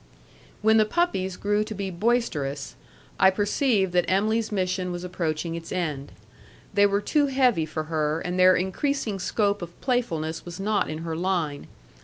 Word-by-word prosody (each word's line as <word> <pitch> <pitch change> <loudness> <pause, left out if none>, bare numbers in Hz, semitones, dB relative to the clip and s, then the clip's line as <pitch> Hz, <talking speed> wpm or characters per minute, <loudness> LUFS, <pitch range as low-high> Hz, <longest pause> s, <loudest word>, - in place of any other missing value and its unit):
When 220 +1 +5
the 215 - +5
puppies 210 - 0
grew 205 +1 +1
to 215 0 -6
be 195 -1 -3
boisterous, 170 - -1 0.4
I 190 - +7
perceived 205 0 +1
that 180 0 +2
Em'ly's 215 +4 +1
mission 185 -2 -1
was 175 0 -5
approaching 170 -2 -2
its 165 0 -7
end. 150 -6 -3 0.6
They 205 0 +5
were 200 0 0
too 290 +5 +2
heavy 250 - +2
for 155 0 -3
her, 155 0 -1
and 180 +2 -3
their 185 0 +7
increasing 210 +3 -1
scope 205 +2 0
of 175 0 -9
playfulness 165 - -1
was 175 +1 -8
not 205 +1 0
in 155 +1 -5
her 165 -1 -3
line. 170 -5 -1
185 Hz, 165 wpm, -25 LUFS, 165-215 Hz, 0.6 s, I